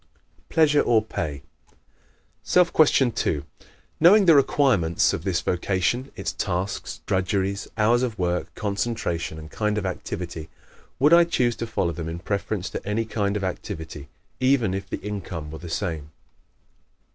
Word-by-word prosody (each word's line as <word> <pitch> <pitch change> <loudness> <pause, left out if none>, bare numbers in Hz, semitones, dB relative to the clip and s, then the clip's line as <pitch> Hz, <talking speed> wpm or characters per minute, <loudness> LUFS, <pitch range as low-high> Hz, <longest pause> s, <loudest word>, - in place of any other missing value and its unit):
Pleasure 150 -2 +4
or 115 -3 +3
Pay? 75 -9 -4 1.0
Self 180 -1 +3
Question 140 -5 +4
2 75 -8 -1 0.6
_Knowing 195 +5 +7
the 170 - +7
requirements 130 - +3
of - - -3
this 90 -3 0
vocation 95 +8 -1
its - - -3
tasks, 95 +3 -3
drudgeries, 95 +1 -1
hours 115 +3 +3
of 120 -4 -2
work, 90 -1 -1
concentration 100 -6 -2
and 80 0 -10
kind 105 -1 -1
of 100 - -2
activity 90 -3 -5 0.5
would 145 +4 +4
I 170 0 +8
choose 125 -8 +1
to 115 - -4
follow 90 -6 -1
them 80 0 -5
in 85 - -4
preference 100 +1 -3
to - - -5
any 105 +3 -1
other 110 - -13
kind 100 -1 0
of 100 - -5
activity 80 -6 -5 0.3
even 130 -7 +2
if 95 0 -5
the - - -3
income 90 -7 -5
were 80 - -8
the 85 - -8
same? 80 -3 -3
100 Hz, 155 wpm, -24 LUFS, 85-120 Hz, 1.0 s, I